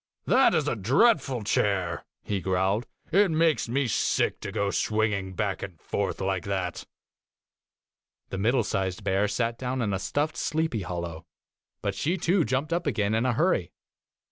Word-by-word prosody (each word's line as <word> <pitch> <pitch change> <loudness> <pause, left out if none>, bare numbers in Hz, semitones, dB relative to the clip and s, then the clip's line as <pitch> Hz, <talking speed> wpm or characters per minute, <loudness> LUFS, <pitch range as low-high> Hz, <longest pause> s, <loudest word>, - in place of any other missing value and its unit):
* - - -56
That - - +5
is - - +1
a - - +1
dreadful 135 - +3
chair,' 100 -4 0 0.2
he 100 -2 -2
growled. 95 +5 0
' - - -34
It 200 +2 +5
makes 160 -5 +2
me 140 +3 +1
sick 120 - +1
to - - -5
go 100 -1 0
swinging 105 -4 0
back 100 -1 -1
and 90 -5 -7
forth 100 +4 -2
like 95 -1 -1
that.' 95 -3 -3 1.4
The 95 - -4
middle 120 +4 +2
sized 95 -2 -2
bear 95 +2 +2
sat 115 +3 -1
down 130 0 -2
in 105 -5 0
a 95 - -1
stuffed 145 +9 -1
sleepy 160 -8 -1
hollow, 85 -2 -5 0.6
but 100 - 0
she 160 - -1
too 175 +1 +2
jumped 135 +7 -1
up 170 -2 -1
again 105 -6 +1
in 115 +3 +2
a 125 - +2
hurry. 155 - +1
105 Hz, 170 wpm, -27 LUFS, 95-135 Hz, 1.4 s, That